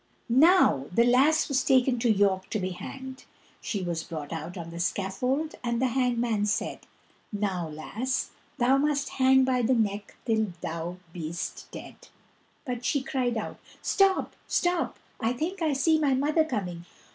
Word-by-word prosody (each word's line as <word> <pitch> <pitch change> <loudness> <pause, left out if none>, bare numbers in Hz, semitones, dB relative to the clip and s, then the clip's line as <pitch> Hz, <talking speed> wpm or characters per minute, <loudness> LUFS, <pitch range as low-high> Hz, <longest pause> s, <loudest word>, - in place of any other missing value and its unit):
Now 325 - +5
the 230 +6 +4
lass 265 +6 +4
was 270 -2 +1
taken 255 -2 +3
to 235 0 +1
York 195 -3 +2
to 215 - -1
be 185 0 -2
hanged; 260 +8 -8 0.4
she 200 -4 -3
was 170 -2 -2
brought 155 -2 -6
out 165 +3 -6
on 170 -1 -7
the 170 - -7
scaffold, 225 - -1
and 235 -1 0
the 260 0 +2
hangman 240 -4 +1
said, 210 - -2 0.4
"Now, 195 -5 -2
lass, 225 +12 -3 0.3
thou 255 +2 +4
must 285 0 +1
hang 265 0 +6
by 255 -1 +2
the 245 +2 +3
neck 205 -2 -1
till 220 -5 +1
thou 170 +2 -4 0.2
be'st 170 0 -5
dead." - - -11 0.6
But 245 -2 -4
she 280 +2 0
cried 250 -3 -1
out: 220 - -5 0.2
"Stop, 390 -1 +2
stop, 350 -1 0 0.2
I 230 0 0
think 340 +9 -3
I 315 -3 +2
see 315 +4 +3
my 280 -3 +2
mother 300 +4 +2
coming! 180 - -4
240 Hz, 160 wpm, -27 LUFS, 190-265 Hz, 0.6 s, hang